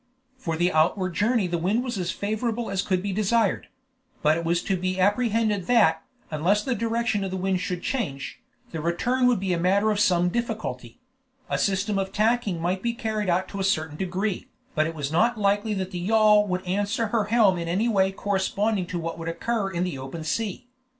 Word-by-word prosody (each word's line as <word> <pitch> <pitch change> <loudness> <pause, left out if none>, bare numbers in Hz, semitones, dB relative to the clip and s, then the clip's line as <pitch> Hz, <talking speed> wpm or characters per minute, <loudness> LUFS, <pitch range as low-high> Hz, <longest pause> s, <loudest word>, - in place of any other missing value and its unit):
For 165 -11 -3
the 175 +2 +2
outward 180 +4 +2
journey 220 +3 +2
the 170 -1 -1
wind 200 +8 +1
was 240 -6 -3
as 180 -1 -2
favorable 220 +3 -2
as 195 -1 0
could 185 -2 -1
be 200 -1 -2
desired; 215 +1 +1 0.6
but 150 +1 +4
it 170 - -3
was 170 +1 0
to 195 - 0
be 185 +1 -2
apprehended 210 -1 +1
that, 180 -10 +4 0.3
unless 180 +7 +1
the 260 - 0
direction 230 -2 0
of 195 - -2
the 190 - -3
wind 185 0 0
should 180 -3 -4
change, 145 - -3 0.3
the 160 - -4
return 245 +10 +1
would 245 -5 +3
be 190 -1 -1
a 170 - 0
matter 200 +5 +3
of 205 - 0
some 180 -4 +3
difficulty; 200 - -4 0.5
a - - +1
system 200 +1 0
of 190 0 -2
tacking 215 -3 +1
might 180 +3 -1
be 235 +2 -1
carried 215 -3 -2
out 180 +2 +1
to 200 - -6
a - - 0
certain 160 -5 0
degree, 190 +3 -2 0.3
but 155 +1 +2
it 165 - -5
was 145 -2 -3
not 230 +9 +2
likely 205 +1 +1
that 190 -1 -3
the 180 - -4
yawl 210 +2 +4
would 185 0 -2
answer 205 +4 -1
her 220 -2 +1
helm 205 -4 +3
in 170 - -4
any 190 +7 +1
way 195 -4 +2
corresponding 200 0 -1
to 180 - -4
what 165 0 -4
would 165 0 -4
occur 200 +4 -1
in 175 -1 -2
the 175 -7 -3
open 135 +5 -6
sea. 200 - -3
195 Hz, 210 wpm, -25 LUFS, 175-215 Hz, 0.6 s, but